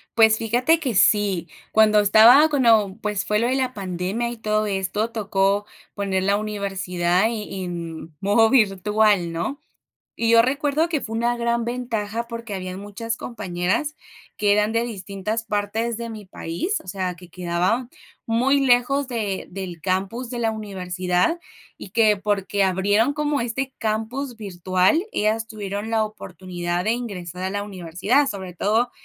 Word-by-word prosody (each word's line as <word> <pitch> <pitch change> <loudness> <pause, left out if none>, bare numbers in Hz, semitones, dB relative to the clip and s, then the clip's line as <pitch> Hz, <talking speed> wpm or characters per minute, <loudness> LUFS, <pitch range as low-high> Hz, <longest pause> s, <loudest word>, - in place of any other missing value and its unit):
Pues 220 -1 +6
fíjate 245 +9 +2
que 260 -8 -2
sí, 195 -4 +3 0.2
cuando 215 -1 +5
estaba 225 +8 +7
cuando, 225 -9 +3
pues, 210 -2 -1
fue 210 0 +1
lo 235 - +1
de 255 - +1
la 255 -1 0
pandemia 190 +4 -3
y 240 - -7
todo 215 -1 0
esto, 205 +3 -1
tocó 200 -2 +1 0.3
poner 195 -2 -1
la 200 +1 +2
universidad 190 -3 0
e 210 -4 -5
en 165 -3 -6
modo 215 +3 +4
virtual, 210 -5 +3
¿no? 170 +12 -3 0.6
Y 230 - +1
yo 230 0 +7
recuerdo 285 +5 +1
que 315 -4 -1
fue 225 -1 -4
una 240 +1 +1
gran 235 0 0
ventaja 235 -2 -3
porque 230 -2 -6
habían 185 -1 -5
muchas 225 +3 -5
compañeras 210 - -2 0.4
que 205 -1 +3
eran 210 +1 +2
de 230 +1 +1
distintas 210 0 -4
partes 215 +2 -2
de 235 0 -5
mi 215 -2 -8
país. 185 - -3
O - - -20
sea, 185 -1 -3
que 180 +1 -14
quedaba 180 +8 -1 0.4
muy 255 +5 +2
lejos 260 +2 +3
de 210 -6 -2
del 180 -3 -6
campus 195 +7 -2
de 245 - -4
la 225 -1 +1
universidad 185 - -1 0.4
y - - -10
que, 215 0 +4
porque 200 0 0
abrieron 205 +6 +2
como 295 -1 0
este 255 +3 -3
campus 225 +4 -3
virtual, 185 - +1
ellas 220 +2 0
tuvieron 205 0 -5
la 220 -1 +2
oportunidad 180 -3 -5
de 220 - +2
aingresar 185 -7 -5
a 190 - -1
la 205 +1 -3
universidad, 195 - 0
sobre 190 -3 -6
todo 220 +7 +1
210 Hz, 155 wpm, -23 LUFS, 190-235 Hz, 0.6 s, estaba